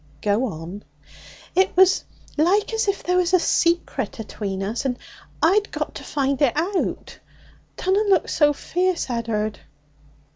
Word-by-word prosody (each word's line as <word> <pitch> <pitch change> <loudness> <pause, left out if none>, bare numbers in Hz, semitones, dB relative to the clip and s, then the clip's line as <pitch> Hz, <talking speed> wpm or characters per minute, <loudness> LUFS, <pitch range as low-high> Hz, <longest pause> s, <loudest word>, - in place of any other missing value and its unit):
'Go 210 +5 +2
on.' 180 -1 -6 0.7
'It 375 +1 +2
was 380 0 +5 0.3
like 375 +8 +2
as 445 -1 0
if 400 0 -1
there 360 +1 +1
was 360 0 +3
a - - +5
secret 335 - 0
atween 200 -3 -4
us, 215 +4 -2
and 255 -2 -1 0.5
I'd 405 +6 +4
got - - -4
to - - -8
find 280 -1 -1
it 275 -5 +4
out. 365 +4 -2 0.6
Dunna 400 +3 +1
look 375 -4 +3
so 295 -2 +3
fierce, 355 +1 -1
Ed'ard!' 220 -3 -2
310 Hz, 145 wpm, -23 LUFS, 230-370 Hz, 0.7 s, was